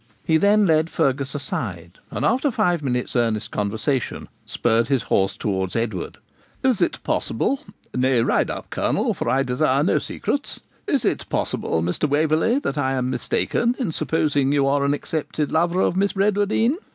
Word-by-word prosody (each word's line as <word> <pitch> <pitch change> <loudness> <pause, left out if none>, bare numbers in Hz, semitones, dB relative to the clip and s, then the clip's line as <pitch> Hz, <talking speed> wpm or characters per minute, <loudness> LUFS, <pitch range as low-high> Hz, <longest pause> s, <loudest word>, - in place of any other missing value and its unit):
He 160 - +4
then 205 +4 +4
led 160 -1 +3
Fergus 140 -3 +1
aside, 95 - -4
and, 120 +7 -2
after 260 +6 +2
five 180 - +1
minutes' 125 -3 -2
earnest 115 -3 0
conversation, 110 +6 -2 0.2
spurred 115 0 +1
his 135 -5 +1
horse 95 0 +1
towards 95 -3 -2
Edward. 110 -6 -3 0.5
'Is 260 -5 +2
it - - 0
possible 275 - 0 0.3
nay, 130 -1 +2
ride - - +1
up, - - -6
Colonel, - - 0
for - - -3
I 135 +1 +2
desire 125 -1 +1
no - - +2
secrets - - -3 0.3
is - - +1
it - - -1
possible, 80 - -1
Mr. 90 - -1
Waverley, 155 - +2
that 150 - -2
I 135 -1 +1
am 130 -1 -1
mistaken 235 - 0
in 245 -11 -1
supposing 145 -4 +1
that 145 - +2
you 140 -1 +3
are 140 +1 +2
an 140 +1 +2
accepted 150 -1 -3
lover 175 +3 +2
of - - +1
Miss 195 +1 +1
Bradwardine? 205 - +2
140 Hz, 170 wpm, -22 LUFS, 120-175 Hz, 0.5 s, He